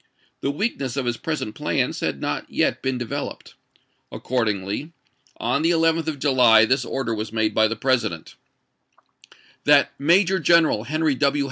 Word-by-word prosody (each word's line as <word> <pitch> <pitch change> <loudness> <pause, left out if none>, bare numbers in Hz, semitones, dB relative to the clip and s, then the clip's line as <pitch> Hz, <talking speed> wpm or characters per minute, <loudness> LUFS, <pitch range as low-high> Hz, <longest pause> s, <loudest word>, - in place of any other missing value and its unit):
The - - -2
weakness 140 - -3
of 135 - -1
his 120 -1 -1
present 155 -8 -4
plans - - -1
had - - -2
not - - -3
yet - - 0
been 130 -1 -2
developed. 120 -2 -6 0.6
Accordingly 115 - -3 0.4
on 140 - -1
the 165 - +2
11th 165 -1 +1
of 155 -2 -2
July 125 -6 +5
this 130 +3 +1
order 125 -1 -3
was 110 0 -4
made 110 -1 0
by 110 0 +3
the 115 - -3
President: 115 -9 -1 1.3
"That - - +4
Major 185 +6 +3
General 160 -8 +3
Henry 155 0 0
W. 140 +2 +1
130 Hz, 150 wpm, -22 LUFS, 115-155 Hz, 1.3 s, July